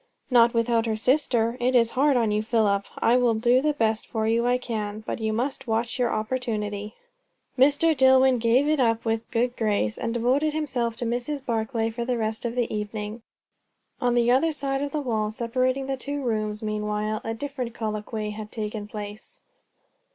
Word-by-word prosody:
"Not 235 -1 +5
without 230 0 +2
her 220 - 0
sister. 240 -1 +1
It 250 +1 +1
is 230 -2 +4
hard 275 0 +3
on 225 -3 +2
you, 210 0 +1
Philip! 215 -3 +1
I 240 +2 +3
will 245 -2 +3
do 240 +3 +3
the 300 +1 +1
best 220 -4 0
for 220 -2 -2
you 230 +2 +2
I 250 0 +3
can; 215 -3 -4
but - - -4
you 220 -1 -1
must 260 +4 -2
watch 230 +2 -1
your 240 -2 +2
opportunity." 215 -2 -3 0.6
Mr. 290 +5 +4
Dillwyn 260 -1 +5
gave 240 +5 +3
it 305 -1 +2
up 230 -2 +1
with 225 0 -1
a - - -39
good 245 +2 0
grace, 205 - 0
and 230 - -2
devoted 255 +6 +1
himself 255 -7 -1
to 240 - -4
Mrs. 245 +4 -3
Barclay 225 0 -1
for 235 +1 -4
the 245 0 -1
rest 220 +1 -2
of 235 0 -2
the 240 -3 -1
evening. 210 +1 -5 0.8
On 245 -1 +2
the 240 0 +3
other 275 +6 +3
side 275 -2 -2
of 285 0 -2
the 305 - -1
wall 220 -5 -1
separating 255 +4 -1
the 270 0 -2
two 285 +2 -4
rooms, 215 -3 -2
meanwhile 210 0 -2
a 225 0 -3
different 255 -2 -5
colloquy 215 0 -3
had 210 0 -8
taken 210 -1 -4
place. 210 0 -8
230 Hz, 190 wpm, -25 LUFS, 220-255 Hz, 0.8 s, Not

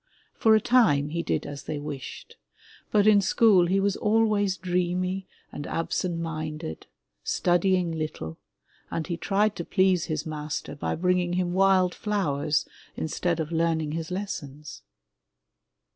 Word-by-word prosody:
For 220 -1 +4
a - - +5
time 210 - +3
he 170 +2 -2
did - - -1
as 145 -1 -7
they 155 - -3
wished, 145 -3 -7 0.5
but 205 -1 +3
in 210 -2 +6
school 190 -2 +4
he 190 +3 +2
was 195 0 +1
always 210 -3 +2
dreamy 180 +1 -1 0.2
and 145 - -6
absent 170 +1 -2
minded, 155 - -5 0.4
studying 180 0 +2
little, 155 - -5 0.5
and 160 - -3
he 175 - -3
tried 205 +4 +1
to 170 - -3
please 185 -1 +2
his 155 -1 -3
master 150 -2 -4
by 145 - -2
bringing 180 +1 +1
him 175 -1 0
wild 190 -1 +4
flowers 155 -8 0 0.3
instead 170 +2 -1
of 160 0 -3
learning 160 -2 0
his 160 0 -4
lessons. 150 -7 -6
175 Hz, 140 wpm, -26 LUFS, 155-195 Hz, 0.5 s, in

